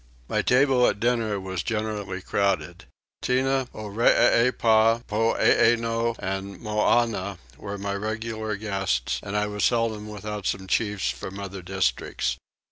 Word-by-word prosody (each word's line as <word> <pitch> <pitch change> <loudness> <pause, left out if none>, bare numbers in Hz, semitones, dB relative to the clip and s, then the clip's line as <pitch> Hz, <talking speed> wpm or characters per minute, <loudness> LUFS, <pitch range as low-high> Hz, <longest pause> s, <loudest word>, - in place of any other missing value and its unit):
My - - 0
table 125 -1 +4
at 100 - 0
dinner 115 -3 0
was 95 -2 -4
generally 105 -3 -3
crowded. 95 -2 -1 0.4
Tinah, 130 +1 +1
Oreepyah, 115 +1 +3
Poeeno, 115 +1 +2
and 95 +1 -4
Moannah, 105 -2 +1 0.2
were 100 +7 -6
my 100 0 -3
regular 110 +1 -3
guests 95 - -1
and 105 0 -3
I 105 - +1
was 105 0 -3
seldom 115 -3 +1
without 105 -1 -5
some 95 0 -2
chiefs 105 0 0
from 95 +1 -7
other 100 -1 -6
districts. 90 -9 -1
105 Hz, 125 wpm, -25 LUFS, 100-115 Hz, 0.4 s, table